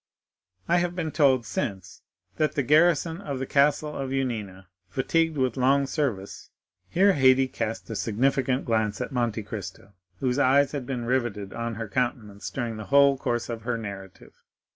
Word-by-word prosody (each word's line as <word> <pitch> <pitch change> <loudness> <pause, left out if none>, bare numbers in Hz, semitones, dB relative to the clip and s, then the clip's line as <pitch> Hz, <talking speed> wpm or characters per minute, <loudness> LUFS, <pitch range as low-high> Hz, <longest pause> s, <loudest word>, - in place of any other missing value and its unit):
I 175 - +3
have 175 0 -1
been 165 -4 -2
told 135 -6 +3
since 95 -4 -4 0.4
that 155 - +1
the 140 - +1
garrison 165 +4 +3
of 140 -8 -4
the 135 - -3
castle 150 +2 +2
of 135 -1 -3
Yanina, 110 -8 -3 0.2
fatigued 160 - 0
with 130 -2 0
long 135 +2 +3
service——" 125 -10 -3 0.4
Here 195 +3 +4
Haydée 130 -3 +4
cast 115 0 -3
a - - -3
significant 130 +4 0
glance 110 -3 0
at 125 +3 -4
Monte 120 -4 -1
Cristo, 100 -2 -8 0.3
whose 130 +1 0
eyes 140 +1 +4
had 140 -4 -5
been 125 -3 -3
riveted 120 -6 -1
on 115 -1 -4
her 115 0 -5
countenance 105 -2 -3
during 120 -4 -4
the 110 - -7
whole 140 +2 +5
course 120 -3 -2
of 115 -2 -5
her 120 +1 -2
narrative. 100 -4 -9
130 Hz, 165 wpm, -26 LUFS, 110-140 Hz, 0.4 s, whole